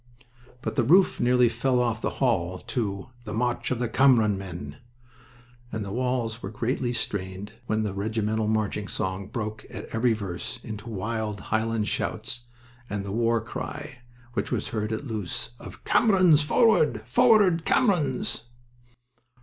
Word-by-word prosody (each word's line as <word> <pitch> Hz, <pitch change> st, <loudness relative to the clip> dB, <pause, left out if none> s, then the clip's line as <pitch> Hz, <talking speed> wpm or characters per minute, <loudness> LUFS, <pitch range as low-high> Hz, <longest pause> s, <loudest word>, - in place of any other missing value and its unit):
But -, -, -3 dB
the 125 Hz, -, +4 dB
roof 180 Hz, +10 st, +5 dB
nearly 125 Hz, 0 st, +4 dB
flew 125 Hz, +2 st, +1 dB
off 120 Hz, -2 st, 0 dB
the -, -, 0 dB
hall 95 Hz, -9 st, +1 dB
to 100 Hz, -2 st, -3 dB
"The 105 Hz, -1 st, -5 dB
March 120 Hz, +1 st, 0 dB
of 130 Hz, -, 0 dB
the 120 Hz, 0 st, -1 dB
Cameron 115 Hz, -4 st, +4 dB
Men," 85 Hz, -6 st, -7 dB, 0.9 s
and 110 Hz, -2 st, -3 dB
the 100 Hz, -, -6 dB
walls 125 Hz, -1 st, -1 dB
were 95 Hz, -, -5 dB
greatly 120 Hz, +3 st, -1 dB
strained 100 Hz, -3 st, -3 dB, 0.2 s
when 110 Hz, 0 st, +1 dB
the 105 Hz, -3 st, -2 dB
regimental 110 Hz, +1 st, -1 dB
marching 105 Hz, -1 st, 0 dB
song 95 Hz, -1 st, -3 dB
broke 110 Hz, -1 st, -4 dB
at -, -, -7 dB
every 115 Hz, +1 st, +2 dB
verse 100 Hz, -5 st, -5 dB
into 110 Hz, +1 st, -7 dB
wild 110 Hz, 0 st, -3 dB
Highland 110 Hz, -1 st, +1 dB
shouts 110 Hz, +3 st, -2 dB, 0.4 s
and 100 Hz, -1 st, -3 dB
the 100 Hz, -, -4 dB
war 115 Hz, +1 st, +2 dB
cry 140 Hz, +4 st, -6 dB, 0.3 s
which -, -, -2 dB
was 120 Hz, -5 st, -1 dB
heard 110 Hz, 0 st, -2 dB
at 110 Hz, +6 st, -3 dB
Loos 105 Hz, -, -3 dB
of -, -, -11 dB
"Camerons, 185 Hz, -8 st, +5 dB
forward!" 150 Hz, -, +3 dB
"Forward, 175 Hz, -, +5 dB
Camerons!" 175 Hz, -, +1 dB
110 Hz, 150 wpm, -26 LUFS, 105-125 Hz, 0.9 s, roof